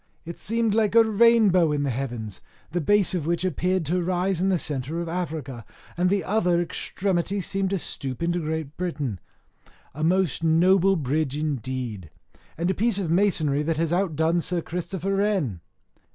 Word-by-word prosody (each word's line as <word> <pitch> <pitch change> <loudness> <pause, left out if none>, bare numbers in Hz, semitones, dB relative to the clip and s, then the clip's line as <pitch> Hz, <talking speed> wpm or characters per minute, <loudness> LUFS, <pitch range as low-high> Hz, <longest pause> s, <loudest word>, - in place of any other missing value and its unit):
It 170 +1 -8
seemed 230 0 0
like 215 0 +1
a 230 - +8
rainbow 215 -6 +4
in 145 -1 0
the 140 - 0
heavens, 120 -5 -5 0.3
the 175 +2 -1
base 205 +4 +3
of 165 -4 -2
which 170 +1 0
appeared 180 +1 0
to 180 +5 0
rise 180 0 0
in 190 - +2
the 185 - +2
centre 145 +1 -3
of 170 - -3
Africa, 155 -8 -4 0.3
and 180 +1 +2
the 195 -1 +1
other 180 -3 +1
extremity 185 +2 -1
seemed 195 +1 -1
to 195 - 0
stoop 135 -4 -5
into 175 +1 0
great 155 -2 -4
Britain. 145 - -3 0.7
A 155 +4 -5
most 180 -1 +1
noble 180 +4 +4
bridge 145 -1 -1
indeed, 130 - -3 0.5
and 170 +3 0
a - - 0
piece 220 +1 +1
of 180 -5 -2
masonry 165 -6 +2
that 160 +1 -1
has 165 +1 0
outdone 170 -2 +1
Sir 175 +1 -2
Christopher 185 +3 -3
Wren. 185 - 0
170 Hz, 170 wpm, -25 LUFS, 150-190 Hz, 0.7 s, a